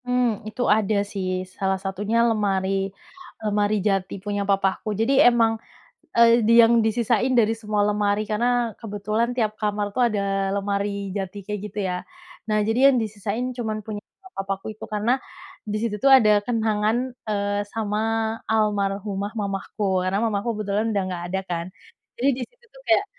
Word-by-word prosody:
Hmm, 250 -4 +1
itu 235 +3 -2
ada 210 -1 +2
sih, 185 -2 -3
salah 190 0 0
satunya 195 +4 -2
lemari 195 -2 0 0.6
lemari 210 0 +1
jati 195 -2 0
punya 205 -1 -1
papahku. 195 +1 +1
Jadi 230 +5 +2
emang, 235 -3 +5 0.6
eee, 235 0 +6
di 230 - +5
yang 230 0 +5
disisain 235 +3 +1
dari 225 -1 +3
semua 210 -2 -1
lemari, 205 0 +1
karena 240 +1 +1
kebetulan 215 +2 -1
tiap 215 -3 +1
kamar 205 -1 -1
tuh 255 - +3
ada 195 -2 -1
lemari 200 -1 -2
jati 195 0 -5
kayak 210 0 -4
gitu 205 - -6
ya. 180 0 -2 0.5
Nah 215 0 +2
jadi 250 +5 +5
yang - - +2
disisain 215 +4 -3
cuman 220 -3 -3
punya 210 -2 -5 0.4
papahku 195 0 -3
itu 215 - -9
karena 215 +5 +1 0.5
disitu 215 +1 -1
tuh 275 - +6
ada 210 -4 +4
kenangan, 220 -1 +1 0.3
eee, 205 -1 0
sama 210 -2 -1 0.5
almarhumah 205 -1 0
mamahku, 195 -1 -1
karena 185 +1 0
mamahku 215 +1 -1
kebetulan 210 +1 -1
udah 200 -2 +1
nggak 175 -2 -4
ada 190 - +1
kan. 170 -1 -2 0.5
Jadi 260 +3 +2
disitu 485 - -16
tuh - - -15
kayak 395 +4 +4
210 Hz, 155 wpm, -24 LUFS, 200-225 Hz, 0.6 s, eee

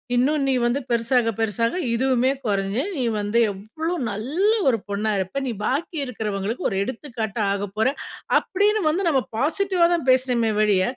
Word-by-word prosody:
இன்னும் 280 +4 +2
நீ 270 - +2
வந்து 240 +4 +1
பெருசாக, 235 0 +2
பெருசாக 225 - 0 0.2
இதுவுமே 260 +1 +2
குறைஞ்சு, 200 +3 0 0.2
நீ 255 - 0 0.2
வந்து 205 +3 +1
எவ்வளோ 225 - -5 0.2
நல்ல 285 - 0 0.2
ஒரு 230 - +2
பொண்ணா 210 +2 -1
இருப்ப. 190 +9 -2
நீ 245 - -1
பாக்கி 315 +5 -1
இருக்கிறவங்களுக்கு 215 -2 -3
ஒரு - - -3
எடுத்துக்காட்டா 225 -3 -4
ஆகப்போற" 205 +3 -1 0.5
அப்படின்னு 415 +2 +1
வந்து, 365 +5 0
நம்ம 270 -4 +2 0.2
பாசிட்டிவா 350 +5 +2
தான் 320 -6 -1
பேசனுமே 250 -3 +2
ஒழிய, 200 -3 +3
240 Hz, 150 wpm, -23 LUFS, 215-280 Hz, 0.5 s, ஒழிய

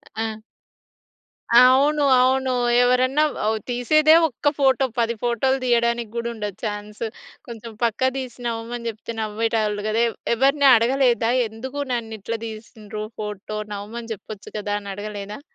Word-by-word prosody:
ఆ! 220 -1 -3 1.2
అవును, 275 +4 +5 0.2
అవును. 260 +1 +2 0.3
ఎవరన్నా 255 +4 +3 0.5
తీసేదే 305 +6 +4
ఒక్క 290 +1 0
ఫోటో 265 -1 +3
10 235 0 +1
ఫోటో‌లు 245 +3 +1
తీయడానికి 235 -2 +1
కూడా 235 0 -2
ఉండదు 210 -4 -5
చాన్స్. 210 +1 -5 0.4
కొంచెం 230 -1 -8
పక్క 235 +3 +2
తీసి 255 -2 -6
నవ్వమని 235 +1 -4
చెప్తే 225 +1 -7
నవ్వేటోళ్ళు 215 -1 -1
కదా! 225 +2 +2 0.3
ఎవరిని 275 +3 +3
అడగలేదా 240 0 +2 0.2
ఎందుకు 255 +6 -6
ననిట్లా 225 -1 -4
తీసిండ్రు 215 -1 -8 0.2
ఫోటో? 210 0 -5 0.2
నవ్వమని 225 +3 -7
చెప్పచ్చు 205 0 -11
కదా 205 0 -2
అనే 200 -1 -8
అడగలేదా? 205 +1 -6
230 Hz, 120 wpm, -22 LUFS, 215-255 Hz, 1.2 s, అవును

